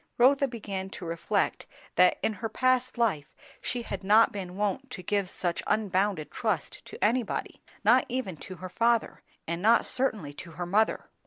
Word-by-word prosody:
Rotha 275 Hz, +3 st, +5 dB
began 200 Hz, -6 st, -5 dB
to 180 Hz, -, -7 dB
reflect 165 Hz, 0 st, -1 dB, 0.3 s
that 180 Hz, +1 st, +5 dB
in 220 Hz, -, +1 dB
her 225 Hz, -, -2 dB
past 255 Hz, +2 st, +1 dB
life 175 Hz, -, 0 dB, 0.3 s
she 245 Hz, -1 st, -3 dB
had 195 Hz, -3 st, -5 dB
not 215 Hz, +4 st, +6 dB
been 185 Hz, -4 st, -6 dB
wont 210 Hz, +6 st, -1 dB
to 185 Hz, -, -7 dB
give 200 Hz, -2 st, 0 dB
such 175 Hz, -2 st, -2 dB
unbounded 195 Hz, -6 st, 0 dB
trust 215 Hz, -, -2 dB
to -, -, -7 dB
anybody; 230 Hz, 0 st, -1 dB, 0.2 s
not -, -, +5 dB
even 250 Hz, -8 st, -2 dB
to 185 Hz, -, -9 dB
her 185 Hz, +1 st, -8 dB
father, 230 Hz, +3 st, +1 dB, 0.3 s
and 170 Hz, +1 st, -2 dB
not 225 Hz, +4 st, +5 dB
certainly 215 Hz, -, -1 dB
to 170 Hz, +3 st, -10 dB
her 175 Hz, +2 st, -4 dB
mother. 210 Hz, +5 st, +1 dB
205 Hz, 170 wpm, -28 LUFS, 180-235 Hz, 0.3 s, not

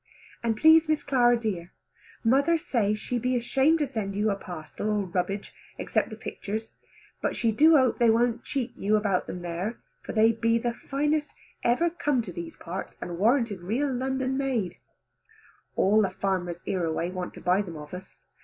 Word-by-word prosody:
And 225 Hz, -2 st, 0 dB
please 320 Hz, +3 st, +6 dB
Miss 310 Hz, -1 st, +1 dB
Clara 245 Hz, -3 st, +4 dB
dear, 190 Hz, -7 st, -4 dB, 0.5 s
mother 280 Hz, +8 st, +4 dB
say 220 Hz, -9 st, 0 dB
she 240 Hz, +3 st, -3 dB
be 250 Hz, +2 st, 0 dB
ashamed 270 Hz, +6 st, +3 dB
to 300 Hz, -, +1 dB
send 220 Hz, -7 st, -4 dB
you 210 Hz, +1 st, +1 dB
a -, -, 0 dB
parcel 175 Hz, +1 st, -6 dB
all 210 Hz, -1 st, +1 dB
rubbage, 185 Hz, +2 st, -3 dB, 0.2 s
except -, -, 0 dB
the -, -, -7 dB
pictures, 220 Hz, +2 st, -5 dB, 0.5 s
but -, -, -1 dB
she 230 Hz, -, +1 dB
do 310 Hz, +8 st, +6 dB
hope 260 Hz, -4 st, +2 dB
they 235 Hz, -1 st, +5 dB
wont 235 Hz, +1 st, +2 dB
cheat 255 Hz, -3 st, -3 dB
you 210 Hz, +2 st, +1 dB
about 205 Hz, -3 st, +1 dB
them 180 Hz, -, -6 dB
there, 175 Hz, +6 st, -3 dB, 0.2 s
for -, -, -7 dB
they 225 Hz, +1 st, +5 dB
be 230 Hz, 0 st, +1 dB
the 235 Hz, 0 st, -1 dB
finest 295 Hz, +4 st, -1 dB, 0.3 s
ever 330 Hz, +9 st, +2 dB
come 290 Hz, -7 st, 0 dB
to 185 Hz, -5 st, -8 dB
these 170 Hz, 0 st, -7 dB
parts, 180 Hz, +3 st, -7 dB
and 175 Hz, -1 st, -6 dB
warranted 230 Hz, -3 st, +2 dB
real 255 Hz, +10 st, -1 dB
London 265 Hz, +1 st, -1 dB
made. 240 Hz, -10 st, -1 dB, 1.0 s
All 210 Hz, +3 st, +4 dB
the 195 Hz, -, +2 dB
farmers 180 Hz, -3 st, -2 dB
hereaway 170 Hz, -1 st, -1 dB
want 185 Hz, -1 st, -5 dB
to -, -, -9 dB
buy 180 Hz, +3 st, +3 dB
them 170 Hz, -5 st, -7 dB
of 150 Hz, +1 st, -10 dB
us. 185 Hz, +1 st, -9 dB
225 Hz, 180 wpm, -27 LUFS, 190-260 Hz, 1.0 s, please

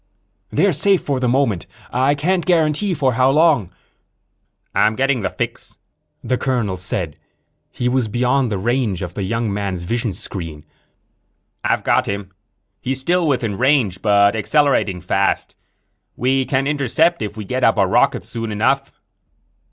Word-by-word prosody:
"They're -, -, +2 dB
safe, 200 Hz, -3 st, +3 dB
for 140 Hz, -3 st, -1 dB
the 125 Hz, -, 0 dB
moment. 120 Hz, -, +1 dB, 0.3 s
I 130 Hz, +3 st, +2 dB
can't 175 Hz, +5 st, 0 dB
guarantee 170 Hz, +2 st, +1 dB
for 135 Hz, -4 st, +1 dB
how 130 Hz, +2 st, +3 dB
long." 145 Hz, -, +3 dB, 1.0 s
"I'm 110 Hz, +1 st, +2 dB
getting 135 Hz, -1 st, +1 dB
the -, -, -1 dB
fix," -, -, -5 dB, 0.5 s
the 125 Hz, -, -1 dB
colonel 120 Hz, -8 st, -1 dB
said. 90 Hz, -4 st, -3 dB, 0.5 s
He 125 Hz, -, -2 dB
was 125 Hz, -2 st, +1 dB
beyond 125 Hz, +2 st, +1 dB
the 100 Hz, -, -1 dB
range 110 Hz, -3 st, -1 dB
of 90 Hz, -1 st, -6 dB
the 100 Hz, -, -5 dB
young 115 Hz, +2 st, -1 dB
man's 100 Hz, -3 st, -3 dB
vision 115 Hz, +4 st, -2 dB
screen. 85 Hz, -5 st, -6 dB, 1.0 s
"I've -, -, 0 dB
got -, -, +2 dB
him. 100 Hz, -1 st, -4 dB, 0.5 s
He's 130 Hz, +1 st, -1 dB
still 175 Hz, +5 st, +1 dB
within 115 Hz, -8 st, -1 dB
range, 125 Hz, -9 st, +2 dB
but 100 Hz, -1 st, +4 dB
accelerating 110 Hz, -, +1 dB
fast. 95 Hz, +3 st, 0 dB, 0.6 s
We 130 Hz, +1 st, +1 dB
can 135 Hz, 0 st, 0 dB
intercept 145 Hz, +4 st, +1 dB
if 105 Hz, 0 st, -4 dB
we 105 Hz, -, -6 dB
get 125 Hz, +6 st, -2 dB
up -, -, +4 dB
a -, -, +4 dB
rocket -, -, +2 dB
soon 115 Hz, -1 st, -5 dB
enough." 135 Hz, +6 st, 0 dB
125 Hz, 150 wpm, -19 LUFS, 100-140 Hz, 1.0 s, but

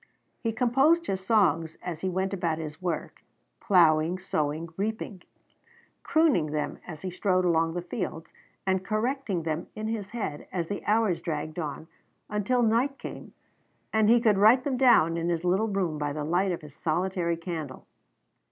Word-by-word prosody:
He 225 Hz, -, -1 dB
composed 270 Hz, +9 st, +3 dB
his 190 Hz, -, -3 dB
songs 165 Hz, -7 st, +2 dB
as 170 Hz, -3 st, -5 dB
he 190 Hz, -, 0 dB
went 190 Hz, +2 st, -1 dB
about 170 Hz, -4 st, -1 dB
his 155 Hz, 0 st, -7 dB
work, 175 Hz, -4 st, -4 dB, 0.4 s
plowing, 170 Hz, -2 st, +4 dB
sowing, 155 Hz, -3 st, -2 dB
reaping; 205 Hz, -1 st, -3 dB, 0.8 s
crooning 310 Hz, -, +3 dB
them 150 Hz, 0 st, -3 dB
as 160 Hz, -2 st, -8 dB
he 185 Hz, -, -3 dB
strode 185 Hz, 0 st, +1 dB
along 165 Hz, -1 st, +2 dB
the 175 Hz, -, -3 dB
fields, 175 Hz, -3 st, -5 dB, 0.3 s
and 190 Hz, -1 st, +1 dB
correcting 215 Hz, -, -1 dB
them 160 Hz, +1 st, -3 dB
in 215 Hz, 0 st, -4 dB
his 210 Hz, -3 st, -3 dB
head 210 Hz, -11 st, -5 dB
as 170 Hz, -3 st, -3 dB
the 205 Hz, -, -4 dB
hours 210 Hz, -5 st, +2 dB
dragged 155 Hz, -1 st, -4 dB
on, 155 Hz, 0 st, -5 dB, 0.4 s
until 210 Hz, +4 st, +1 dB
night 240 Hz, +5 st, +2 dB
came, -, -, -9 dB, 0.6 s
and 220 Hz, -1 st, +4 dB
he 240 Hz, +1 st, +6 dB
could 215 Hz, -4 st, +3 dB
write 225 Hz, +5 st, +6 dB
them 275 Hz, -1 st, -1 dB
down 235 Hz, -11 st, +5 dB
in 170 Hz, +1 st, -1 dB
his 170 Hz, -1 st, -1 dB
little 190 Hz, +5 st, +2 dB
room 185 Hz, -7 st, -1 dB
by 145 Hz, -1 st, -1 dB
the 150 Hz, 0 st, -3 dB
light 180 Hz, +5 st, +1 dB
of 175 Hz, -, -3 dB
his 150 Hz, -2 st, -11 dB
solitary 175 Hz, +1 st, -1 dB
candle. 165 Hz, -6 st, -6 dB
185 Hz, 170 wpm, -27 LUFS, 165-215 Hz, 0.8 s, he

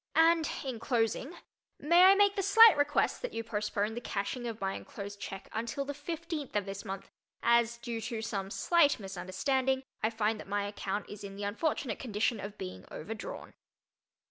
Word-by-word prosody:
And 325 Hz, 0 st, +5 dB, 0.2 s
in 255 Hz, -4 st, -4 dB
closing 240 Hz, +6 st, 0 dB, 0.4 s
may 340 Hz, +4 st, +6 dB
I 385 Hz, +1 st, +8 dB
make 405 Hz, 0 st, +4 dB
the 390 Hz, -, 0 dB
slight 440 Hz, +3 st, +8 dB
request 290 Hz, 0 st, +1 dB
that -, -, -5 dB
you 230 Hz, -, -2 dB
postpone 210 Hz, -1 st, -1 dB
the 240 Hz, -, -5 dB
cashing 240 Hz, +3 st, -3 dB
of 225 Hz, -1 st, -5 dB
my 195 Hz, 0 st, -1 dB
enclosed 205 Hz, -7 st, -7 dB
check 195 Hz, -1 st, -7 dB
until 235 Hz, +5 st, -2 dB
the 285 Hz, -, -4 dB
fifteenth 310 Hz, -, -5 dB
of 205 Hz, -2 st, +1 dB
this 195 Hz, 0 st, -6 dB
month, 195 Hz, 0 st, -6 dB, 0.3 s
as, 235 Hz, 0 st, +3 dB
due 235 Hz, -1 st, -5 dB
to 225 Hz, 0 st, -4 dB
some 195 Hz, -3 st, -3 dB
slight 310 Hz, -, +3 dB
misunderstanding, 235 Hz, +8 st, -1 dB, 0.2 s
I 220 Hz, -, +2 dB
find 220 Hz, -1 st, 0 dB
that -, -, -9 dB
my 205 Hz, 0 st, -1 dB
account 205 Hz, 0 st, -3 dB
is 205 Hz, 0 st, -9 dB
in 195 Hz, -1 st, -7 dB
the 205 Hz, -, -6 dB
unfortunate 230 Hz, +2 st, -1 dB
condition 225 Hz, -1 st, 0 dB
of 200 Hz, +1 st, -7 dB
being 90 Hz, 0 st, -7 dB
"overdrawn." -, -, -7 dB
230 Hz, 180 wpm, -31 LUFS, 205-285 Hz, 0.4 s, I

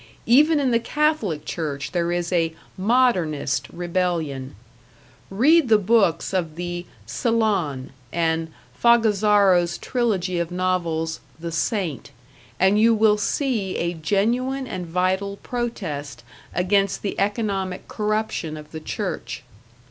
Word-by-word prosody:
Even 295 Hz, +6 st, +5 dB
in 265 Hz, -3 st, +1 dB
the 230 Hz, -, +3 dB
Catholic 235 Hz, -, 0 dB
Church 145 Hz, -4 st, -4 dB
there 170 Hz, -1 st, 0 dB
is 175 Hz, 0 st, -1 dB
a 165 Hz, -2 st, +1 dB, 0.2 s
"modernist" 185 Hz, -, +1 dB
rebellion; 170 Hz, -, -2 dB, 0.7 s
read 270 Hz, +8 st, +4 dB
the 220 Hz, -, +7 dB
books 195 Hz, -5 st, +2 dB
of 165 Hz, -5 st, -1 dB
the 175 Hz, 0 st, -5 dB, 0.2 s
"Sillon", 185 Hz, -, 0 dB, 0.2 s
and 165 Hz, -1 st, 0 dB, 0.2 s
Fogazzaro's 205 Hz, -6 st, +4 dB
trilogy 195 Hz, -8 st, -1 dB
of 170 Hz, -1 st, -1 dB
novels, 170 Hz, -3 st, -1 dB, 0.2 s
"The 170 Hz, 0 st, -5 dB
Saint", 165 Hz, -, -2 dB, 0.5 s
and 190 Hz, +3 st, +4 dB
you 230 Hz, 0 st, +5 dB
will 215 Hz, -1 st, +4 dB
see 215 Hz, -4 st, -1 dB
a 170 Hz, +1 st, -1 dB
genuine 235 Hz, -, 0 dB
and 185 Hz, -7 st, -5 dB
vital 190 Hz, +3 st, 0 dB
protest 165 Hz, -, -4 dB, 0.3 s
against 195 Hz, +2 st, +1 dB
the 200 Hz, -, -3 dB
economic 195 Hz, -3 st, -1 dB
corruption 210 Hz, -7 st, -2 dB
of 150 Hz, 0 st, -11 dB
the 160 Hz, -, -6 dB
Church. 155 Hz, -, -4 dB
185 Hz, 120 wpm, -23 LUFS, 165-220 Hz, 0.7 s, the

